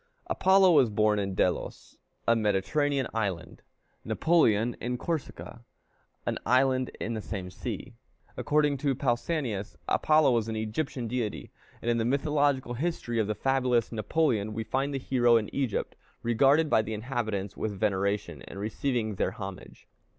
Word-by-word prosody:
Apollo 190 0 +4
was 135 -8 +5
born 105 0 +2
in 100 -1 -2
Delos, - - -2 0.3
a 115 - +5
Mediterranean 115 +7 +1
island; 100 -6 -3 0.4
Napoleon 120 -9 +2
in 125 +1 -2
Corsica, 135 -5 -5 0.6
an - - -1
island 130 +1 +2
in 115 - -3
the 110 - -3
same 95 -4 -6
sea. 120 +4 -6 0.4
According 145 +3 +1
to 135 0 0
Pausanias, 120 - -2
Apollo 155 -3 +4
was 115 -2 +1
an 110 - -3
Egyptian 115 +3 -3
deity; 115 -2 -3 0.3
and 120 - +1
in 115 - +1
the - - +1
mythological 140 -1 +1
history 125 -4 -2
of 110 - +1
the 105 - -1
fabulous 125 -3 +1
Napoleon 110 -2 0
we 110 - -2
find 135 +6 -1
the 140 - -2
hero 120 -3 +3
in 110 -2 -3
Egypt, 130 -6 -2 0.3
regarded 135 +7 +4
by 110 - +4
the 110 0 -4
inhabitants 110 -4 -3
with 105 -3 -4
veneration, 100 -5 -1
and - - -9
receiving 110 +1 -1
their 95 - -1
homage. 95 -3 -9
120 Hz, 150 wpm, -28 LUFS, 105-135 Hz, 0.6 s, was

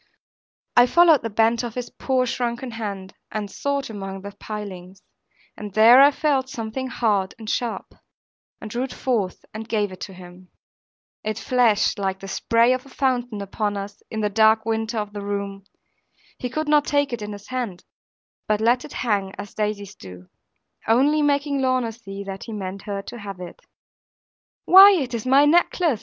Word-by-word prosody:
I 245 0 +7
followed 335 0 +5
the 230 - -4
bent 225 +2 +2
of 235 -2 -5
his 250 -1 -5
poor 260 -1 0
shrunken 245 +1 -3
hand, 200 -4 -6 0.2
and 205 -2 -4
sought 280 -1 -2
among 195 -3 -7
the 200 - -7
pilings; 195 -3 -8 0.5
and 205 -2 -8
there 230 +4 +8
I 280 - +8
felt 280 -3 0
something 260 0 -4
hard 210 -6 0
and 220 -2 -11
sharp, 235 +1 -3 0.7
and 215 - -8
drew 240 - -2
it 265 - -9
forth 215 -8 -2
and 220 +1 -7
gave 210 -3 0
it 185 - -10
to 195 - -7
him. 180 0 -14 0.7
It 215 0 -3
flashed, 235 -5 +2
like 190 -1 -2
the 195 - -9
spray 230 +5 +2
of 255 0 -3
a 275 - -16
fountain 245 -6 -1
upon 205 +1 -2
us, 200 +1 -7
in 220 - -3
the 210 - +1
dark 220 +1 +4
winter 225 +1 -2
of 210 -1 -3
the 205 - -5
room. 200 -1 -4 0.7
He 250 - -3
could 310 +4 -3
not 295 -1 +4
take 285 -2 +1
it 235 - -4
in 210 0 -5
his 205 0 -10
hand, 240 -8 -4 0.6
but 215 -1 +1
let 240 +3 +2
it - - -10
hang, 200 -4 0
as 205 - -8
daisies 210 -2 -3
do; 90 - -13 0.6
only 280 +7 +3
making 285 -1 +1
Lorna 255 -3 +1
see 200 -3 -9
that 195 -1 -7
he 225 - -7
meant 195 -1 -5
her 200 -1 -3
to 240 - -9
have 200 -3 -8
it. 180 -1 -9 1.1
'Why, 390 +2 +9
it 270 -9 -1
is 235 +1 -4
my 275 +3 +6
glass 295 - +4
necklace!' 340 - +2
220 Hz, 185 wpm, -23 LUFS, 200-255 Hz, 1.1 s, Why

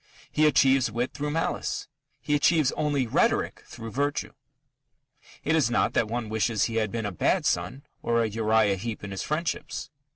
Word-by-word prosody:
He 155 0 +4
achieves 135 -4 +4
wit 120 +3 -2
through 150 +1 -3
malice: 165 +2 -2 0.3
he 150 - -2
achieves 145 -1 +3
only 145 -3 0
rhetoric 115 - +1
through 115 0 -8
virtue. 145 +4 -1 1.1
It 155 - +2
is 145 -8 +3
not 120 - +1
that 110 - +2
one 115 0 -3
wishes 110 0 0
he 115 -1 -1
had 110 -2 0
been 115 -2 -3
a 105 - -2
bad 90 - +1
son 90 +11 -1 0.2
or 115 0 +2
a - - +1
Uriah 110 -2 +2
Heep 110 +3 -5
in 100 - -6
his 95 - -4
friendships. 155 -2 -3
120 Hz, 175 wpm, -27 LUFS, 110-145 Hz, 1.1 s, He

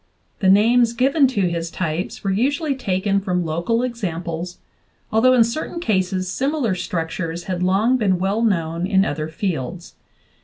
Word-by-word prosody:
The 190 -4 +3
names 230 +4 +4
given 270 +4 +3
to 250 -6 -1
his 170 -1 -3
types 165 +1 -4
were 195 - 0
usually 280 - 0
taken 200 -5 0
from 180 -3 -1
local 170 +10 0
examples, 175 -7 -4 0.5
although 230 +4 +4
in 245 -2 +6
certain 310 +8 -4
cases 185 - 0
similar 265 +2 0
structures 170 -1 -3
had 180 -1 -3
long 200 +8 +2
been 195 -6 +1
well 195 +5 0
known 170 -5 0
in 195 -1 +3
other 155 +1 -3
fields. 170 0 -4
190 Hz, 150 wpm, -21 LUFS, 175-235 Hz, 0.5 s, in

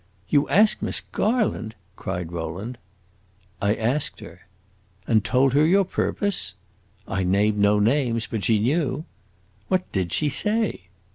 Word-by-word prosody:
"You 145 -1 +2
asked 210 +3 +4
Miss - - 0
Garland?" 210 - -1 0.2
cried 90 -5 -5
Rowland. 90 +9 -5 0.8
"I 100 +2 +2
asked 125 +6 -1
her." - - -13 0.6
"And 110 -3 +2
told 130 +1 +2
her 145 +2 +4
your 190 +5 +4
purpose?" 200 +1 -2 0.5
"I 95 -1 -1
named 100 +3 +2
no 100 +1 +4
names. 115 +1 +1
But 110 -3 -4
she 110 - +3
knew!" 140 +6 0 0.6
"What 185 -1 -1
did 95 -4 -1
she 150 - +1
say?" 210 - 0
120 Hz, 135 wpm, -24 LUFS, 100-155 Hz, 0.8 s, asked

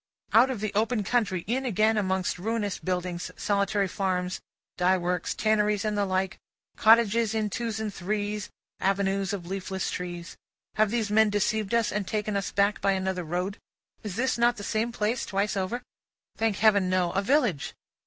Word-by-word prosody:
Out 240 +4 +6
of 245 -6 -3
the 215 -1 -2
open 220 +1 +1
country, 195 -4 0
in 255 +4 -1
again 220 -2 +2
among 190 -3 0
ruinous 210 0 -2
buildings, 180 -1 -3
solitary 200 0 +1
farms, 185 -1 -2 0.3
dye 185 +1 +3
works, 180 0 -2
tanneries, 210 -1 +1
and 210 -1 0
the 205 -1 +1
like, 185 0 -1 0.4
cottages 225 0 +4
in 215 -2 0
twos 225 0 -3
and 215 -2 -3
threes, 205 +2 -3 0.3
avenues 195 0 +1
of 195 -4 -4
leafless 190 +1 -3
trees. 175 -1 -6 0.4
Have 215 -1 +2
these 220 -2 -1
men 220 0 +5
deceived 205 +1 0
us, 230 -2 +2
and 205 -2 -2
taken 210 -1 -2
us 200 -1 -1
back 200 +1 +1
by 195 - +3
another 190 -1 -1
road? 180 +5 -3 0.4
Is 235 +5 -1
not 240 +1 +3
this 205 - -6
the - - -3
same 225 +2 0
place 225 +2 -1
twice 200 +2 -1
over? 200 +6 -2 0.5
Thank 220 -2 +1
Heaven, 200 -2 +4
no. 180 -2 +1
A 195 - 0
village. 235 - +1
205 Hz, 175 wpm, -27 LUFS, 190-220 Hz, 0.5 s, Out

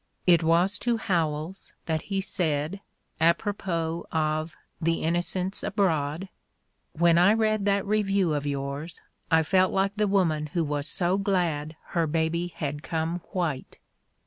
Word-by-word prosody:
It 175 -2 +6
was 175 +4 +2
to 240 -1 +1
Howells 165 -3 -2
that 160 -1 -1
he 195 -1 0
said, 160 0 -1 0.4
apropos 170 -1 0
of 155 0 -1 0.3
"The 165 +1 0
Innocents 180 +3 0
Abroad": 170 -4 0 0.7
"When 170 +1 +4
I 190 +4 +6
read 215 -2 +1
that 200 -1 +2
review 195 -4 +1
of 145 -1 -2
yours 140 +3 -3 0.3
I 160 0 +4
felt 185 +3 +3
like 195 +2 0
the 210 0 +2
woman 165 -6 +1
who 165 +3 -1
was 145 0 -2
so 180 +2 +1
glad 170 -6 0
her 170 -3 +1
baby 165 +2 0
had 145 -4 -4
come 165 +2 -2
white." 170 -9 -3
170 Hz, 140 wpm, -27 LUFS, 155-195 Hz, 0.7 s, It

